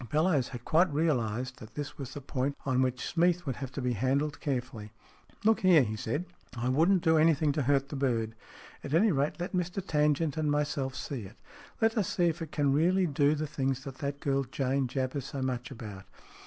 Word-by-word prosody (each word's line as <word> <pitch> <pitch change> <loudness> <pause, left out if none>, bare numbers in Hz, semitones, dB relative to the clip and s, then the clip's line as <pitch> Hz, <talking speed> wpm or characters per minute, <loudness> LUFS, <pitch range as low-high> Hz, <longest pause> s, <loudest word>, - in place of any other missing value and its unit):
Bellowes 155 - +2
had 120 -2 -8
quite 170 +1 +3
realized 125 -5 0
that 110 +1 -12
this 145 0 -6
was 135 -3 -6
the 145 - -5
point 140 +1 -2
on 130 -2 +2
which 130 -1 0
Smeath 175 0 +2
would 135 -4 -3
have 135 -2 -5
to 135 - -4
be 125 -1 +1
handled 140 +6 0
carefully. 125 -7 -3 0.3
" - - -28
Look 220 0 +5
here," 175 -6 +6
he 110 -2 -3
said, 150 +9 -2 0.2
" - - -17
I 120 +2 -1
wouldn't 170 +7 +3
do 160 -1 +4
anything 155 -2 +4
to 145 - -1
hurt 140 0 +1
the 150 - -5
bird. 115 -5 0 0.5
At 145 +2 -1
anyrate, 165 -6 +2
let 175 +3 -4
Mr 180 +1 -1
Tangent 150 -1 +1
and 155 -1 +1
myself 145 -2 -1
see 130 0 -4
it. 105 +5 -13 0.4
Let 225 0 +3
us 195 - 0
see 175 - +2
if 165 +1 -4
it 160 -2 -5
can 145 -2 +2
really 180 +6 +3
do 145 -1 +2
the 155 +1 -2
things 135 -2 -2
that 135 -3 -8
that 140 0 -3
girl 135 -1 +1
Jane 135 +1 -1
jabbers 130 +1 -2
so 135 -2 -4
much 125 -2 -2
about. 105 -7 -8
140 Hz, 215 wpm, -30 LUFS, 130-155 Hz, 0.5 s, here